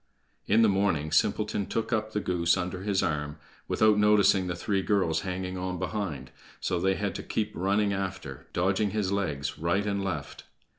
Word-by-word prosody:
In 110 +3 +5
the - - +6
morning, 95 -7 +1
Simpleton 105 +4 +1
took 115 +1 -2
up 110 -1 -1
the 105 - -1
goose 85 -2 +1
under 90 +1 -3
his 100 -1 0
arm, 75 -3 -2 0.3
without 110 -1 +3
noticing 105 -3 +4
the 85 - -2
three 95 +3 -1
girls 95 -5 +1
hanging 95 0 -4
on 90 0 -3
behind, 80 -11 -4 0.3
so 90 - -1
they 95 +2 +2
had 100 -1 -2
to - - -5
keep 110 -1 -2
running 100 +3 +1
after, 95 -8 -5
dodging 95 +4 +1
his 100 -2 -1
legs 75 -8 -2
right 85 +5 +1
and 100 -1 -1
left. 80 -7 -5
95 Hz, 180 wpm, -28 LUFS, 85-100 Hz, 0.3 s, the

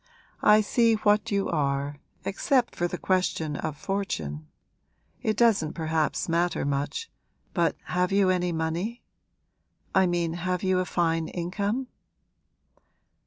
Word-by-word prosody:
I 210 +1 +6
see 230 +2 +3
what 210 +1 +2
you 200 -2 +1
are, 140 -2 -1 0.3
except 245 +5 +1
for 175 - 0
the 180 - -4
question 180 -5 0
of 150 0 -4
fortune. 80 - -3 0.7
It 215 -1 0
doesn't 215 -10 +3
perhaps 160 -1 -1
matter 170 -1 +1
much, 145 - -2 0.4
but 170 -4 +2
have 180 +1 0
you 195 -1 +4
any 180 -1 0
money? 170 +8 -2 0.9
I 190 -1 +4
mean 170 -2 0
have 180 +1 -2
you 185 -1 +2
a 185 - 0
fine 165 -2 0
income?' 200 +8 -2
180 Hz, 125 wpm, -27 LUFS, 160-200 Hz, 0.9 s, I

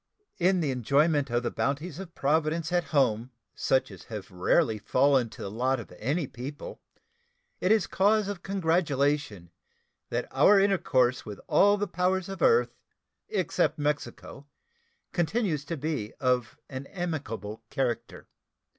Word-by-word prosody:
In 185 0 +3
the 145 -4 0
enjoyment 140 +3 +2
of 120 +1 0
the 120 - -1
bounties 145 +4 -2
of 185 -3 -9
Providence 155 +3 0
at 175 -1 +1
home 125 -5 +1 0.2
such 130 0 +1
as - - -12
have 105 -3 -8
rarely 110 - +2
fallen 130 +1 +2
to - - -9
the 100 - -5
lot 130 +4 0
of 115 - -10
any 145 +8 0
people, 130 +4 -8 0.8
it 185 - +1
is 220 -3 +4
cause 205 +1 +2
of 200 -3 -5
congratulation 145 - 0 0.6
that 120 +1 -2
our 195 +10 +6
intercourse 130 -11 +2
with 105 -3 -8
all 205 +1 +4
the 205 - 0
powers 185 0 0
of 195 - -6
the - - +3
earth 465 0 +4 0.6
except 430 - 0
Mexico 145 -1 -4 0.6
continues 175 -3 0
to 165 +3 -4
be 145 -7 -3
of 125 -4 0
an 130 0 -7
amicable 115 - -5
character. 125 -4 -3
145 Hz, 145 wpm, -28 LUFS, 125-175 Hz, 0.8 s, our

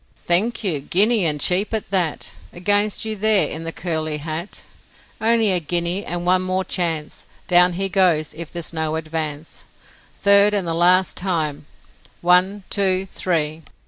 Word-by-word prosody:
'Thank 215 +7 +2
you? 170 -8 -1
Guinea! 200 - +2
and 150 -1 -1
cheap 190 +8 +1
at 215 - -5
that! 180 -5 -1 0.2
Against 205 +4 0
you 220 0 -2
there 215 0 +3
in 160 +1 -6
the 165 - -3
curly 160 -3 -3
hat! 160 +5 -6 0.6
Only 225 -2 +3
a 180 - +1
guinea, 175 +4 -2
and 175 0 -4
one 185 +1 +3
more 185 0 -1
chance, 165 -4 -2 0.2
Down 180 0 +5
he 195 +3 -1
goes 175 -5 +1
if 165 0 -9
there's 170 -1 -5
no 160 -1 -1
advance, 155 -1 -5 0.6
Third, 200 +1 +5
and 195 -3 -1
the 165 - -2
last 180 +2 +3
time, 155 -6 -2 0.5
one! 185 +3 +3
two! 190 -1 +1
three!' 160 -4 -2
180 Hz, 155 wpm, -20 LUFS, 160-195 Hz, 0.6 s, Down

